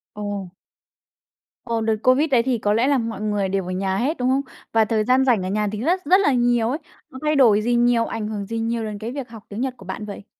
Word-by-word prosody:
Ồ. 205 -3 -4 1.1
Ồ, 230 -2 -2
đợt 220 0 +1
Covid 275 +5 +4
đấy 235 -3 +4
thì 250 -1 0
có 205 0 +1
lẽ 230 +4 +2
là 285 -1 +3
mọi 225 -4 -3
người 205 -2 -1
đều 195 -1 -1
ở 185 - -4
nhà 190 +1 -1
hết, 285 +9 0
đúng 250 0 0
không? 270 +1 +2 0.3
Và 225 -1 +4
thời 215 -1 0
gian 255 +3 +3
rảnh 235 -7 +2
ở 185 - -3
nhà 210 +1 0
thì 210 - -5
rất 355 +6 0
rất 365 +5 +6
là 290 -8 +3
nhiều 240 -2 +2
ấy. 285 - -1 0.3
Nó 260 - -10
thay 305 0 +1
đổi 225 -6 +5
gì 240 +3 0
nhiều, 240 -1 +3
ảnh 215 -2 -4
hưởng 210 -2 -4
gì 230 +3 -4
nhiều 230 0 -1
đến 210 -1 -5
cái 225 +2 -5
việc 265 -2 -6
học 225 -2 -11
tiếng 210 +3 -5
Nhật 260 -1 -1
của 195 - -13
bạn 210 +3 -5
vậy? 200 -1 -8
230 Hz, 270 wpm, -22 LUFS, 210-255 Hz, 1.1 s, rất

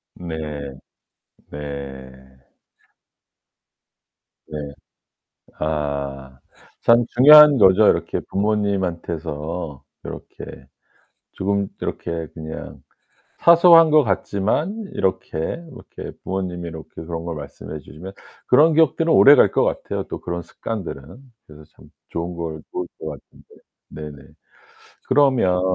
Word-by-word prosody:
네. 85 -2 -6 1.2
네. 70 -3 -7 2.4
네. 75 - -7 1.0
아. 70 -4 -4 0.4
참 115 0 +4
중요한 150 +2 +9
거죠. 100 0 +6
이렇게 - - +1
부모님한테서 85 -7 -2 0.2
요렇게 65 0 -10 0.7
조금 100 +1 -1
이렇게 85 -2 -4
그냥 80 -1 -8 0.6
사소한 170 -1 +7
것 155 -1 +6
같지만 125 - -1
이렇게 95 -4 -2 0.2
뭐 170 -1 -13
이렇게 - - -8
부모님이 90 -2 -4
이렇게 80 -1 -10 0.2
그런 80 0 -6
걸 85 -1 -4
말씀해 75 +1 -8
주시면 85 +7 -11 0.3
그런 155 +5 +5
기억들은 160 +1 +2
오래갈 145 +1 +7
것 - - +2
같아요 - - -3
또 - - -8
그런 85 0 -4
습관들은. 90 -7 -6 0.4
그래서 75 0 -15
참 - - -18 0.2
좋은 85 +1 -4
걸 80 -2 -5
좋을 90 -1 -4
것 - - -7
같은데. - - -22 0.3
네네. 75 -2 -10 0.8
그러면 120 -11 +3
85 Hz, 225 characters per minute, -21 LUFS, 75-110 Hz, 2.4 s, 중요한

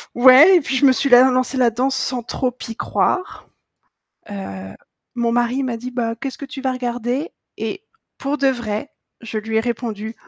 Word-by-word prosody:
Ouais, 260 +9 +8
et - - +1
puis 270 -1 -3
je 275 - +3
me 265 - +7
suis 275 +2 0
la 245 0 +8
lancée 255 +1 0
là-dedans 250 +2 +2
sans 260 -2 -2
trop 250 +1 -2 0.2
y 225 - -7
croire. 370 - -2 0.8
Heu, 95 - -7 0.4
mon 235 -1 0
mari 240 +3 0
m'a 245 -3 -2
dit: 250 +2 -7
«Bah 230 -2 -2
qu'est-ce 265 +3 -6
que 280 - -7
tu 275 0 -8
vas 260 -1 -1
regarder?» 245 +4 -3 0.3
et 385 +3 -5 0.3
pour 280 +2 -2
de 275 - +1
vrai, 235 -1 -3 0.3
je 225 -1 -4
lui 220 +1 -3
ai - - +4
répondu: 225 -2 -4
245 Hz, 185 wpm, -20 LUFS, 230-265 Hz, 0.8 s, Ouais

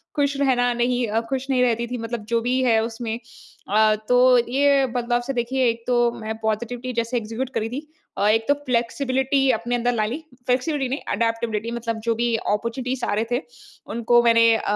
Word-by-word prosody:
खुश 285 -1 +1
रहना 250 -3 +2
नहीं, 245 0 +1 0.2
खुश 270 0 -3
नहीं 260 -2 +2
रहती 235 -1 +1
थी। 245 +1 -4
मतलब 230 -1 -5
जो 230 - +3
भी 250 +2 0
है 230 -3 +4
उसमें 225 0 -4 0.5
अ, 215 +1 +4
तो 250 0 +6
ये 275 0 +4
बदलाव 240 0 0
से 275 - -1
देखिए 255 +2 0
एक 230 0 -4
तो 245 -1 +3 0.2
मैं 220 0 -4
पॉजिटिविटी 240 +3 -2
जैसे 230 +1 -1
एक्जीक्यूट 230 +3 -4
करी 225 -2 -1
थी। 280 +6 -6 0.4
एक 225 +1 +3
तो 285 - +5
फ्लेक्सिबिलिटी 260 +2 0
अपने 235 +2 -1
अंदर 245 0 0
ला 220 - 0
ली, 240 +7 -3 0.3
फ्लेक्सिबिलिटी 265 +2 0
नहीं 270 +4 -2
एडप्टबिलिटी 230 0 -1
मतलब 230 -1 -3
जो 230 - +3
भी 235 0 0
अपॉर्चुनिटीज़ 240 +4 -2
आ - - -1
रहे 215 +2 0
थे 245 +4 +1 0.5
उनको 235 +1 +3
मैंने 230 -1 +5
अ - - -2
240 Hz, 185 wpm, -23 LUFS, 230-255 Hz, 0.5 s, तो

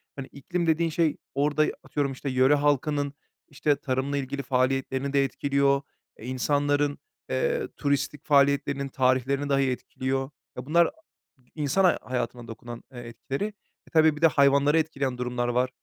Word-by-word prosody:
hani, 135 -2 -6
iklim 170 +5 -3
dediğin 165 +1 +2
şey 160 -1 +1 0.2
orada 150 +2 +2
y - - -1
atıyorum, 140 -2 -1
işte, 135 +1 -5
yöre 130 +3 +4
halkının, 145 0 +1 0.3
işte, 145 0 0
tarımla 140 0 -2
ilgili 140 0 -3
faaliyetlerini 135 +1 0
de 140 -1 +4
etkiliyor, 140 +1 +1 0.4
eee, 110 - -10
insanların, 145 +2 0 0.3
eee, 485 -2 0
turistik 145 0 -1
faaliyetlerinin 140 -1 +2
tarihlerini 130 +2 +1
dahi 135 -1 +2
etkiliyor. 130 +1 -3 0.3
E, 125 - -6
bunlar 170 +4 +4
a - - -3 0.5
i 125 - -31
insan 150 +5 +1
ha 180 - +4
hayatına 125 -1 -4
dokunan 120 +1 -9
e 125 - -9
etkileri. 120 - -5 0.4
E, - - -16
tabii 160 -1 +5
bir 150 - -10
de 165 - +8
hayvanları 140 +1 +4
etkileyen 140 -5 -2
durumlar 125 0 -2
var. 125 +1 +1
140 Hz, 160 wpm, -26 LUFS, 130-145 Hz, 0.5 s, de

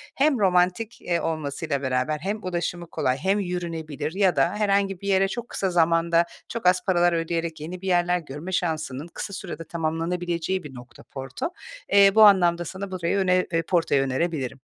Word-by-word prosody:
hem 280 -2 +2
romantik, 185 +3 +1
eee, 170 -1 -1
olmasıyla 150 -2 -2
beraber 130 +3 0
hem 205 +6 -4
ulaşımı 175 -1 -3
kolay 130 0 0
hem 190 +7 +1
yürünebilir. 165 -5 -4
Ya 195 -2 +3
da 135 -1 +3
herhangi 200 -3 +1
bir 200 - -6
yere 195 0 +3
çok 240 +4 -6
kısa 190 - -1
zamanda 170 0 +3 0.2
çok 230 -5 -2
az 180 0 +3
paralar 175 -2 +3
ödeyerek 165 -1 -2
yeni 175 +4 -7
bir 190 - -6
yerler 180 0 +2
görme 155 +3 -8
şansının 155 -5 -2
kısa 200 - -5
sürede 185 -3 -6
tamamlanabileceği 170 +2 -2
bir 145 -3 -10
nokta 125 0 -13
Porto. 135 - -5 0.4
Eee, 200 0 +6
bu 220 - +6
anlamda 175 -4 +5
sana 190 +3 -6
burayı 180 +1 -1
öne 185 -1 +2
eee, 165 - +2
Porto’yu 165 -4 +1
önerebilirim. 135 -1 -2
175 Hz, 170 wpm, -24 LUFS, 160-190 Hz, 0.4 s, Eee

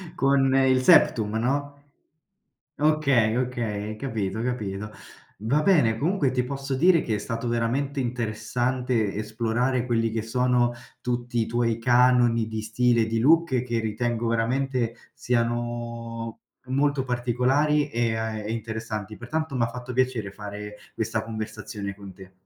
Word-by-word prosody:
Con 135 -1 +3
il 130 -1 +4
Septum, 110 -3 +5
no? 145 +5 -1 1.0
Okay, 140 -7 +3
okay. 110 -4 -2
Capito, 110 -5 -3
capito. 105 -4 -3 0.5
Va 140 +8 +1
bene. 135 - +4
Comunque, 155 - +1
ti 125 -1 0
posso 135 +1 -4
dire 170 +4 +5
che 110 - -1
è - - -1
stato 115 +4 -4
veramente 125 +4 -1
interessante 120 -1 -1
esplorare 115 +4 -1
quelli 115 -2 +1
che 110 0 -1
sono 120 +1 +1 0.3
tutti 120 -1 -2
i 110 - +1
tuoi 115 -1 0
canoni 120 -1 +4
di 110 -1 -4
stile 115 +2 +2
e 110 - +2
di 115 0 -1
look 140 -1 +3
che 120 -2 -1
ritengo 115 +1 -1
veramente 120 +1 0 0.2
siano 115 -1 -3 0.2
molto 140 +1 +1
particolari, 130 +4 +1
ehm, 110 -3 -1
e 105 - -3
interessanti. 110 -2 -5
Pertanto 155 +4 -3
m'ha 115 -2 +2
fatto 125 +1 -7
piacere 125 -5 0
fare 105 0 -8 0.2
questa - - -2
conversazione 110 -2 -6
con 100 -2 -11
te. 95 0 -14
120 Hz, 135 wpm, -25 LUFS, 110-130 Hz, 1.0 s, Septum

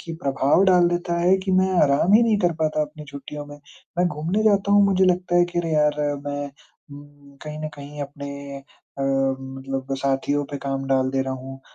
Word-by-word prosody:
कि 165 - -7
प्रभाव 140 +7 +2
डाल 180 -2 +5
देता 175 0 -1
है 180 +2 +4
कि 190 - 0
मैं 185 +1 +3
आराम 145 +7 +3
ही 230 - +7
नहीं 225 -3 +2
कर 175 -3 +2
पाता 155 -1 +1
अपनी 150 +1 -8
छुट्टियों 145 +1 -8
में। 145 - -10 0.4
मैं 180 - +3
घूमने 170 +7 -1
जाता 200 -1 +3
हूँ, 205 0 +6
मुझे 190 -1 +3
लगता 180 -1 +1
है 175 - +5
कि 175 - -1
अरे 165 -2 -1
यार, 150 -1 +2 0.3
मैं 145 0 -3 0.5
उम, 145 -1 -16
कहीं 150 0 -7
न - - -2
कहीं 145 +1 -9
अपने 140 0 -7
अ, 135 0 -12
मतलब 135 0 -2
साथियों 140 +2 0
पे - - -2
काम 135 0 -2
डाल 130 -1 +1
दे 135 0 0
रहा 130 0 -3
हूँ 135 +1 -9
145 Hz, 205 wpm, -23 LUFS, 135-175 Hz, 0.5 s, ही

